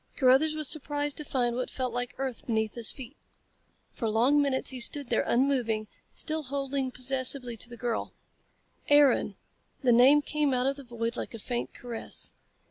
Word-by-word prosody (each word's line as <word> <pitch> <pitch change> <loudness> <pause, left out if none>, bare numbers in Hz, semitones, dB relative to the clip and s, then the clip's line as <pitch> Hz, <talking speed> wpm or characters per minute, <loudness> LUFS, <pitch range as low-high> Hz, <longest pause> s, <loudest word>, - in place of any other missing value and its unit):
Carruthers 270 +4 +4
was 305 -2 +1
surprised 290 -1 0
to 300 - -4
find 245 -5 -1
what 250 0 -3
felt 255 -2 -3
like 245 0 -3
earth 265 -3 -4
beneath 220 -2 0
his 235 -2 +1
feet. 265 +1 -10 0.8
For 230 -4 -3
long 250 +7 +3
minutes 275 -2 0
he 260 - -6
stood 275 +2 +2
there, - - +2
unmoving, 235 -5 +1 0.3
still 315 0 -2
holding 275 -1 -2
possessively 255 -1 -1
to 225 - -5
the 240 - -10
girl. 235 -2 -2 0.8
"Aaron!" 290 -1 +4 0.5
The 245 -2 +5
name 270 +5 +6
came 295 -3 0
out 250 0 0
of 275 +1 0
the 280 - -9
void 235 -1 -4
like - - -5
a - - -6
faint 240 +2 -4
caress. 235 -2 -1
255 Hz, 175 wpm, -28 LUFS, 240-280 Hz, 0.8 s, name